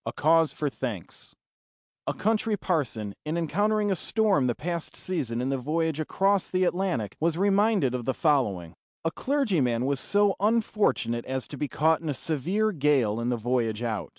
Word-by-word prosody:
A - - -3
CAUSE 160 +1 +3
FOR 150 - -3
THANKS 120 -9 -6 0.7
A - - -1
country 220 0 +1
parson, 125 - -2
in 155 +2 -2
encountering 205 +6 +1
a - - +2
storm 195 - +2
the 120 - 0
past 170 0 -4
season 125 -10 -3
in 130 - -1
the 135 -1 -1
voyage 160 +3 -1
across 195 +5 +1
the 185 0 +1
Atlantic, 175 - -1
was 165 +1 +1
reminded 200 - +2
of 125 -2 -3
the 130 - -1
following: 105 - +1 0.3
A 165 - +1
clergyman 170 - 0
was 140 0 0
so 205 +5 +2
unfortunate 205 - +1
as 130 -2 -3
to - - -7
be 150 - -2
caught 160 +3 +2
in 160 - -4
a 145 - -1
severe 180 +11 0
gale 135 - +2
in 120 +1 -1
the 120 - 0
voyage 115 -1 -1
out. 110 -4 -3
155 Hz, 180 wpm, -27 LUFS, 125-195 Hz, 0.7 s, CAUSE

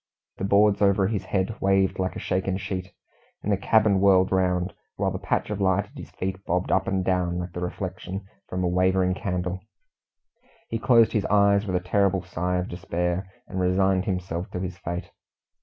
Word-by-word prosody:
The 95 - -2
boards 100 +1 +4
over 100 -1 +4
his 100 0 -2
head 95 +3 -2
waved 95 -1 +2
like 95 0 -1
a - - -4
shaken 95 0 -1
sheet, 95 -1 -5 0.5
and 105 - -1
the - - +4
cabin 105 0 +3
whirled 95 -2 +5
round, 90 -1 +1 0.2
while - - 0
the - - -4
patch - - -1
of 105 -1 -3
light 95 +1 +2
at - - -23
his - - -9
feet 95 0 -4
bobbed 90 0 -1
up 95 0 +2
and 95 -1 0
down 90 -2 0
like 90 0 -4
the 90 - -6
reflection 90 +2 -5 0.2
from 90 0 -2
a - - +2
wavering 95 +1 +2
candle. 90 -1 -3 1.1
He 115 - -2
closed 115 -2 +5
his 105 - +1
eyes 100 0 +3
with 95 - -1
a 90 0 -2
terrible 100 -1 +2
sigh 90 0 -2
of 90 +1 -2
despair, 90 +1 -2 0.2
and 95 - -4
resigned 95 +1 +2
himself 90 -2 -3
to 90 - -2
his 90 -1 -4
fate. 85 +1 -5
95 Hz, 190 wpm, -25 LUFS, 90-100 Hz, 1.1 s, whirled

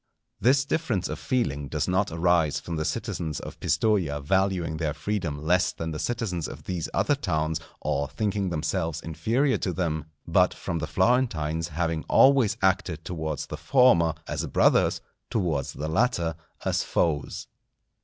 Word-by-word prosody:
This 135 +4 +4
difference 125 - -1
of - - -4
feeling 75 - -1
does 75 +2 -2
not 95 +2 +1
arise 80 -3 +2
from 85 +2 -5
the 80 -1 -2
citizens 90 - -3
of - - -9
Pistoja 90 -10 +1
valuing 90 0 0
their 80 -2 -2
freedom 85 -2 -2
less 90 +3 +3
than 80 0 -5
the 75 - -5
citizens 105 -8 -2
of - - -9
these 90 -3 -3
other - - +2
towns 80 +1 -1 0.2
or 70 0 0
thinking 100 +6 -1
themselves 85 0 -1
inferior 120 - 0
to 95 - -1
them, 80 -4 -2 0.2
but - - +3
from 85 - -3
the 75 - -3
Florentines 85 -8 +1
having 80 +1 -2
always 135 -5 +5
acted 90 -4 +1
towards 80 -4 -3
the - - -6
former 105 - +4
as - - -3
brothers, - - +3 0.3
towards 80 - -1
the 75 - -4
latter 85 -2 +1 0.3
as - - +1
foes. 75 -5 -1
85 Hz, 155 wpm, -26 LUFS, 80-100 Hz, 0.3 s, always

